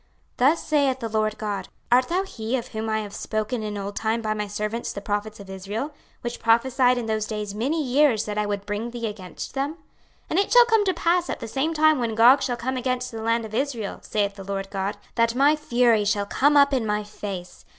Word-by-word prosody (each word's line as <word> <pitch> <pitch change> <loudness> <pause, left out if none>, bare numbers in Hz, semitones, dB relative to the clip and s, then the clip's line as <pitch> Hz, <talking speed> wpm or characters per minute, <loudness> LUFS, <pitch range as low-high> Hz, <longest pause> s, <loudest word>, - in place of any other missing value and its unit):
26:038:017 255 +3 +6
Thus 330 - -3
saith 280 -4 +2
the 230 -3 -4
Lord 215 0 0
GOD; 205 -2 -3 0.2
Art 250 +1 +5
thou 365 +3 0
he 240 - -3
of 240 - -6
whom 220 0 -4
I 220 0 0
have 205 -1 -8
spoken 215 +2 -2
in 210 -1 -4
old 200 0 -5
time 225 +1 -1
by 215 0 0
my 210 -1 -3
servants 210 +3 -3
the - - -5
prophets 210 +1 -3
of 200 - -10
Israel, 200 +9 -5 0.3
which 240 0 -5
prophesied 245 +2 +3
in 240 - -2
those 215 -1 -1
days 210 -2 -4
many 280 +9 -1
years 260 -3 +3
that 210 - -4
I 210 - 0
would 200 -1 -3
bring 210 +3 -3
thee 235 -1 -5
against 205 -4 -6
them? 275 +2 -1
26:038:018 - - -27 0.5
And 335 - +3
it 400 - 0
shall - - +8
come 450 -3 +3
to 375 - +2
pass 345 +1 +1
at - - -3
the - - -6
same 275 +8 -1
time 310 -2 +4
when 230 -2 -1
Gog 245 +5 +7
shall 245 -2 -1
come 260 +2 -2
against 255 0 -2
the 225 -1 -6
land 230 0 +1
of 215 - -10
Israel, 235 -5 -2
saith 205 -1 -1
the 195 - -7
Lord 195 0 -4
GOD, 195 +1 -2 0.2
that 230 0 +2
my 285 +4 +5
fury 240 -7 +2
shall 205 0 +1
come 290 +8 +3
up 280 0 +5
in 255 -3 +1
my 210 0 0
face. 200 -3 -7
230 Hz, 240 wpm, -24 LUFS, 210-265 Hz, 0.5 s, shall